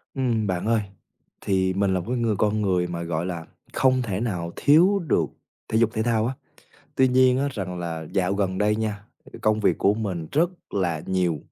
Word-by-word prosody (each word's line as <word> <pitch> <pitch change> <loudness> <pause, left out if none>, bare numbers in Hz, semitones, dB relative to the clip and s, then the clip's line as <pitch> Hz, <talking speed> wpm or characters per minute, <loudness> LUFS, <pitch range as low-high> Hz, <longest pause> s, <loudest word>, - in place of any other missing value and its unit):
Ừm, 115 -5 0
bạn 90 0 -2
ơi, 115 0 +2 0.6
thì 95 -1 +1
mình 95 0 +1
là 95 - +1
một 85 - -6
cái 125 - 0
người 115 -3 +1
con 105 +2 +1
người 90 -3 +1
mà, 85 -1 -4
gọi 85 0 -2
là, 85 -3 -5 0.3
không 130 -1 +3
thể 100 -6 -2
nào 90 -7 -3
thiếu 175 +8 +5
được 155 - +1 0.4
thể 110 - 0
dục 115 -1 +4
thể 110 - 0
thao 115 -2 +1
á. 130 - -2 0.6
Tuy 130 0 +4
nhiên 130 0 +4
á 140 +1 +1
rằng 90 -6 -4
là 80 -2 -4
dạo 95 -1 +1
gần 95 -2 -1
đây 105 +1 +2
nha, 105 -2 -3 0.2
ừm, - - -13
công 110 0 +2
việc - - +2
của 100 - +3
mình 95 -7 -3
rất 165 +4 +3 0.2
là 85 -6 -1
nhiều, 90 -4 0
105 Hz, 215 wpm, -24 LUFS, 90-115 Hz, 0.6 s, thiếu